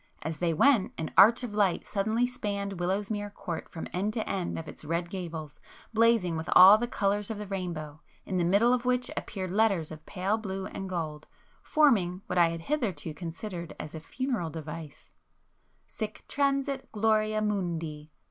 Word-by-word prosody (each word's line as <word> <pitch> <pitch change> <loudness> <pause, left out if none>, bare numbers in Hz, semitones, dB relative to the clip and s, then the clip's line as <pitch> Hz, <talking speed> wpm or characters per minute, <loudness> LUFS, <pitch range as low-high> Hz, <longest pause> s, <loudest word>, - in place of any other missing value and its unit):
As 160 -1 -4
they 175 -1 +1
went 235 - +4
an 160 - -4
arch 230 +4 +7
of 235 -4 -4
light 200 -4 +1
suddenly 220 +4 0
[p - - +3
285] - - -12
spanned 200 -5 -3
Willowsmere 205 +3 -2
Court 170 -2 -5
from 160 - -6
end 200 +4 -1
to 220 - -2
end 185 -3 -2
of 160 - -6
its - - -10
red 170 +3 -2
gables, 165 -5 -6 0.3
blazing 225 -6 +3
with 160 +1 -4
all 195 +4 +10
the 240 - -1
colours 205 -2 0
of 220 - -3
the 210 - -5
rainbow, 170 -6 -5 0.2
in 190 - -2
the 175 - +2
middle 200 +8 +4
of 250 -1 0
which 250 0 0
appeared 185 -3 -4
letters 195 -6 +2
of 155 -1 -9
pale 195 +4 -1
blue 195 -2 -4
and 195 -1 -6
gold, 155 -4 -4 0.3
forming 200 - +3
what - - 0
I 170 -1 +6
had 165 0 -5
hitherto 190 - -2
considered 170 +1 -6
as 150 - -7
a 160 - -5
funereal 240 - -3
device, 155 -1 -8 0.7
"Sic 215 -1 -6
transit 275 -1 0
gloria 215 0 +2
mundi! 170 -7 -2
195 Hz, 180 wpm, -29 LUFS, 165-220 Hz, 0.7 s, all